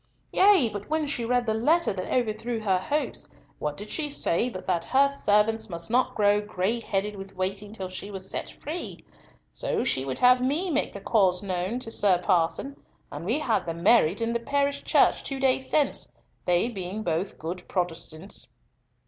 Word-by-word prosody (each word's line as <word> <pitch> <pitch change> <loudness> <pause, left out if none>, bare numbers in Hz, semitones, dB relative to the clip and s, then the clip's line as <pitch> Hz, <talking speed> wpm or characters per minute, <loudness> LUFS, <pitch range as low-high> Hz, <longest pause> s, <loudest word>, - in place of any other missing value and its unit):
"Yea; 385 - +6
but 205 0 -6
when 310 0 +1
she 280 -5 -1
read 245 +1 +1
the 220 - +1
letter 305 +7 +2
that 185 -1 -5
overthrew 230 -1 -1
her 195 -4 +1
hopes, 295 +11 -3 0.3
what 150 -1 -3
did 210 +1 -7
she 300 -2 -1
say 245 -4 0
but 185 -6 -8
that 175 -2 0
'her 275 +6 +3
servants 220 -3 +1
must 170 +2 -2
not 255 +1 +2
grow 205 0 +3
gray 210 +2 -1
headed 210 -1 -2
with 195 0 -9
waiting 195 +2 -3
till 195 -4 -5
she 185 +2 -7
was 190 -2 -4
set - - -3
free'! 285 - -6 0.5
So - - -1
she 130 - 0
would 130 -1 -3
have 250 0 +5
me 305 +8 +1
make 290 - 0
the 200 - -8
case 190 -4 +2
known 185 +3 -2
to 225 - -5
Sir 200 -4 +3
Parson, 180 +10 0 0.3
and 145 - -6
we 230 +9 +1
had 245 - 0
them 165 0 -4
married 205 -4 +4
in 230 +1 -1
the 235 - 0
parish 280 +3 0
church - - +3
two 275 -1 -4
days 265 0 +1
since, 295 -2 +1 0.3
they 180 +4 +2
being 200 -2 -5
both 175 +2 -2
good 175 +3 -6
Protestants." 175 0 -4
210 Hz, 190 wpm, -26 LUFS, 185-250 Hz, 0.5 s, Yea